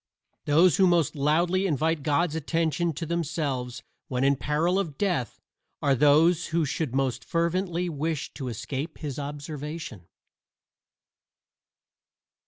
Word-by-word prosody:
Those 160 +3 +5
who 190 - +5
most 170 -4 +2
loudly 170 +7 +2
invite 160 0 0
God's 155 +3 +1
attention 165 +2 0
to 165 +4 -5
themselves 145 -6 -2 0.2
when 130 -4 -1
in 140 +1 +4
peril 155 +8 +1
of 160 -8 -3
death 175 - -1 0.4
are 140 -2 +2
those 155 +6 +4
who 165 0 +1
should 140 -2 -2
most 135 -2 0
fervently 175 +1 -1
wish 155 -1 -3
to 135 -3 -6
escape 125 +6 -5
his 145 -3 -5
observation. 145 - -6
155 Hz, 120 wpm, -26 LUFS, 140-170 Hz, 0.4 s, Those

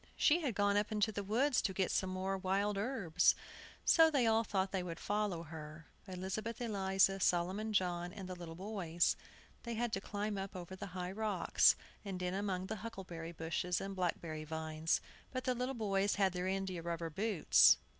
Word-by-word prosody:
She 325 +3 +4
had 260 -9 -1
gone 205 0 +3
up 205 +2 0
into 215 0 +2
the 205 -1 -3
woods 245 +7 +2
to 190 - -1
get 190 -2 +1
some 190 - +1
more 190 +1 -1
wild 195 +2 0
herbs, 195 -6 +2 0.5
so 325 -1 +7
they 275 -6 +2
all 225 0 +4
thought 195 -3 -1
they 190 - 0
would 170 -2 -5
follow 205 -5 -1
her, 155 0 -9 0.2
Elizabeth 190 +6 -4
Eliza, 195 -4 +2
Solomon 185 +5 +1
John, 180 -3 0
and 190 -1 -7
the 185 - -5
little 170 -2 -8
boys. 175 -3 0 0.5
They 235 -1 -4
had 235 0 -1
to 195 - 0
climb 205 0 -3
up 195 0 -5
over 180 +1 -7
high 180 -1 -4
rocks, 205 -3 +3 0.3
and 195 -3 -4
in 180 0 -1
among 190 -2 -2
huckleberry 190 -7 -6
bushes 170 +1 -1
and 195 0 -5
black 180 -2 0
berry 155 -2 -5
vines. 160 +1 -1 0.3
But 255 -1 -3
the 255 - +1
little 250 +2 -2
boys 200 -3 +1
had 195 -2 +2
their 180 0 -2
india 190 -2 -2
rubber 165 -1 -3
boots. 155 - +5
195 Hz, 185 wpm, -36 LUFS, 175-210 Hz, 0.5 s, so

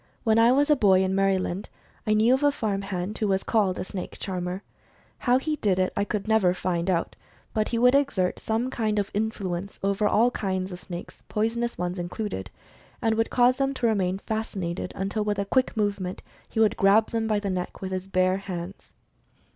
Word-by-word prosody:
When 225 -1 +4
I 230 +1 +6
was 285 +3 +3
a - - +7
boy, 190 -6 +4
in 190 0 0
Maryland, 195 -1 0 0.4
I 215 - +4
knew 225 +4 +5
of 265 - +2
a 290 0 +4
farm 210 -7 -2
hand 195 +1 -4
who 215 - +1
was 195 -1 +1
called 200 -5 +1
a - - -2
"snake 185 0 -6
charmer." 185 0 -4 0.6
How 250 0 +3
he 305 +3 -2
did 200 -8 +1
it, 185 0 +1
I 200 - 0 0.2
never 220 -4 +3
could - - -11
find 175 0 -1
out, 170 -2 0 0.4
but 215 -1 0
he 235 - -1
would 250 +2 +5
exert 275 -11 +1
some 230 +4 -1
kind 215 -4 -1
of 200 -1 -1
influence 200 -3 -3
over 200 +1 +2
all 235 +4 +4
kinds 190 -3 -2
of 180 - -7
snakes, 175 -2 -8
poisonous 235 +2 -1
ones 180 +1 -3
included, 175 - -4 0.5
and 225 -1 +1
would 225 0 +1
cause 250 +1 +4
them 275 0 0
to 250 - -1
remain 190 -5 +1
fasci 220 0 -3 0.2
nated - - -5
until 200 +3 -1
with 210 -1 -1
a 200 - -1
quick 255 +3 +1
movement 200 -3 -1 0.3
he - - -3
would 220 -1 +3
grab 205 +3 +4
them 225 -1 0
by 215 -1 +1
the 200 -1 -2
neck 180 -1 -4
with 190 -1 -5
his 185 0 -3
bare 185 0 +2
hands. 185 -1 -7
205 Hz, 210 wpm, -26 LUFS, 185-225 Hz, 0.6 s, a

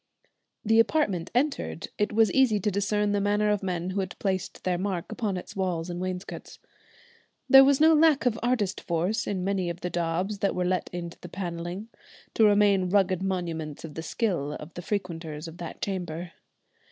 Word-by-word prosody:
The 225 +1 +4
apartment 205 - +2
entered, 275 - -1
it 210 - +1
was 220 -2 +4
easy 255 -6 +4
to 210 - 0
discern 205 +1 0
the 205 0 +1
manner 205 +1 +2
of 210 - 0
men 180 -1 -2
who 195 - -2
had 190 -1 -4
placed 190 -2 -3
their 180 -1 0
mark 190 -1 -3
upon 215 -4 -2
its 180 +3 -8
walls 180 -3 -2
and 175 +1 -5
wainscots. 185 0 -6 0.9
There 270 -1 +9
was 275 0 +4
no 320 +1 +6
lack 310 -3 +4
of 230 -2 +1
artist 230 -5 0
force 175 +5 -1
in 185 -3 -2
many 190 -2 0
of 170 +1 -6
the 180 - -3
daubs 175 +4 -1
that 200 - 0
were 180 - 0
let 185 0 0
into 170 -1 -6
the - - -10
panelling, 175 +3 -5 0.4
to 225 - +3
remain 205 -3 +4
rugged 190 -2 +2
monuments 165 -6 -3
of 155 - -9
the 160 - -5
skill 165 - -1
of 150 +2 -9
the 175 - -6
frequenters 170 -5 -4
of 165 +1 -10
that 170 -3 -7
chamber. 175 -3 -4
190 Hz, 190 wpm, -27 LUFS, 175-210 Hz, 0.9 s, There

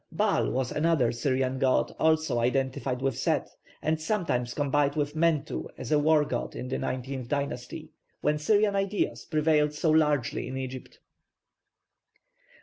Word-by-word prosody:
+Baal+ - - +1
was 130 -1 -1
another 150 -6 +2
Syrian 130 +1 -1
god 130 -1 +2
also 160 -5 +2
identified 130 +1 -1
with 135 -3 0
Set, - - 0 0.3
and 155 0 0
sometimes 155 - -1
combined 145 0 +1
with 145 0 -1
Mentu 160 -2 0
as - - -6
a 150 - +4
war 150 0 +4
god 120 -4 -4
in 125 - -5
the - - -2
nineteenth 130 -1 -4
dynasty, 140 -3 -4 0.3
when 150 0 +1
Syrian 205 +5 +3
ideas 195 +1 -1
prevailed 150 -1 +2
so 155 +1 +1
largely 150 -5 +1
in 130 - -5
Egypt. 130 -1 -7
145 Hz, 145 wpm, -28 LUFS, 130-155 Hz, 0.3 s, a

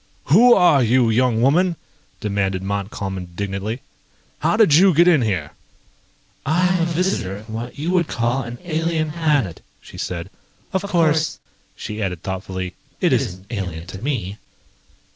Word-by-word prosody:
"Who 240 +6 +8
are 175 -7 +5
you, 120 0 +3
young 120 0 +2
woman?" 170 +6 +3 0.5
demanded 100 -2 -1
Montcalm 100 0 -3
indignantly. 95 +6 -4 0.6
"How - - +1
did 215 -9 +5
you 180 +2 +6
get 170 +3 +5
in 165 -6 +5
here?" 95 -10 -1 0.9
"I 175 +5 +2
am 180 - +1
a - - +2
visitor 165 - -1
from 110 0 -10
what 120 +2 -6
you 160 +5 -2
would 175 -3 +2
call 120 +2 0
an 120 0 -7
alien 160 -2 -1
planet," 150 - 0 0.2
she - - -12
said. 90 +1 -4 0.4
"Of 190 - +1
course," 160 -5 +1 0.4
she 105 +1 -6
added 90 -4 -3
thoughtfully, 95 -1 -4 0.3
"it - - +2
isn't 95 +1 -1
alien 90 -7 -4
to 95 +2 -9
me." 110 -8 -3
120 Hz, 150 wpm, -21 LUFS, 95-165 Hz, 0.9 s, Who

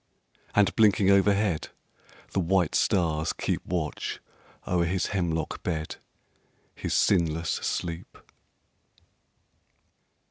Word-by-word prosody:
And 105 -1 +3
blinking 100 -3 +4
overhead 100 -3 +2 0.6
the - - 0
white 90 -1 +1
stars 80 -4 +1
keep - - -2
Watch 85 -4 -3 0.5
o'er 90 -1 +1
his 90 +2 -1
hemlock 80 -5 -2
bed 80 -3 -3 0.8
his - - -3
sinless 85 -3 +2
sleep. 85 0 -3
90 Hz, 85 wpm, -27 LUFS, 80-95 Hz, 0.8 s, blinking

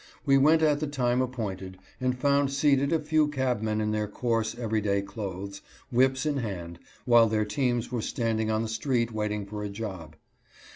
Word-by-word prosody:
We 135 -2 +5
went 155 +4 +5
at 150 -2 +3
the 155 - -2
time 125 -3 +1
appointed, 100 -7 -4 0.2
and 125 0 0
found 140 +1 +2
seated 140 0 +2
a 165 - +4
few 155 0 +2
cabmen 125 -7 -1
in 105 0 0
their 105 -1 -1
coarse, 115 +1 -1
every 110 -2 -1
day 100 -1 0
clothes, 100 -1 -6 0.3
whips 130 +3 +2
in 150 -2 0
hand, 90 -8 -5 0.3
while 120 -2 +6
their 110 0 +1
teams 120 +1 -1
were 120 -2 -1
standing 110 -1 -1
on 110 +1 +1
the - - -3
street 115 +1 0
waiting 105 -1 -2
for 105 +1 -6
a 105 - -3
job. 95 -7 -7
115 Hz, 185 wpm, -27 LUFS, 105-135 Hz, 0.3 s, while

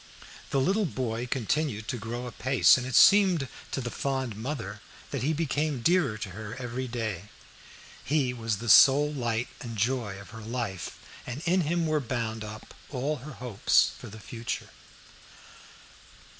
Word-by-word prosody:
The 135 - +1
little 195 +8 +2
boy 120 -4 -3
continued 125 -2 -1
to 130 - -2
grow 120 +3 -5
apace, 130 +2 +4
and 130 0 -2
it 130 - -3
seemed 190 -8 +6 0.2
to - - -3
the 120 -1 -4
fond 130 -5 -2
mother 105 -4 -5 0.3
that 140 - -2
he 140 +5 +1
became 150 -4 -1
dearer 165 -10 +3
to 100 -2 -6
her 110 +4 -7
every 125 0 -4
day. 110 -6 -3 0.8
He 135 -3 +1
was 115 -3 -2
the 120 +3 -7
sole 145 +5 +7
light 120 -3 -1
and 115 -2 -7
joy 115 -2 0
of 100 - -12
her 115 -1 -9
life, 110 -5 -4 0.3
and 125 +6 -5
in 180 +2 +3
him 170 +1 0
were 155 -1 +1
bound 115 -4 -3
up 110 0 -9 0.2
all 145 +3 -2
her 145 +3 -9
hopes 120 -5 +2
for - - -10
the 110 +2 -10
future. 115 +3 -5
125 Hz, 160 wpm, -28 LUFS, 110-145 Hz, 0.8 s, sole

